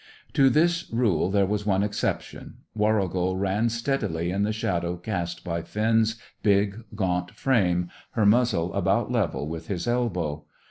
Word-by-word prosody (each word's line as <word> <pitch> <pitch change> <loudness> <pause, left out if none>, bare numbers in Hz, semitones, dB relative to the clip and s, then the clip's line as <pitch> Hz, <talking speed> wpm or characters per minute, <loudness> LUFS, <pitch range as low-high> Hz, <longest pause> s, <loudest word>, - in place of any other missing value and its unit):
To 135 -3 +5
this 170 +4 +2
rule 110 -8 +1
there 100 0 +3
was 105 +1 -1
one 95 -1 +2
exception. 105 0 -3 0.2
Warrigal 95 -4 +1
ran 100 +4 +1
steadily 115 -8 -1
in 100 +2 -1
the 105 +1 +1
shadow 90 -5 -1
cast 90 -2 -4
by 85 -2 -2
Finn's 110 +3 +1 0.3
big, 100 +1 +2
gaunt 90 -3 0
frame, 90 -9 +2 0.3
her 110 -3 +2
muzzle 105 -6 +3
about 100 +5 +1
level 100 -11 0
with 80 +1 -6
his 95 +2 -3
elbow. 90 -11 -1
100 Hz, 145 wpm, -26 LUFS, 90-115 Hz, 0.3 s, To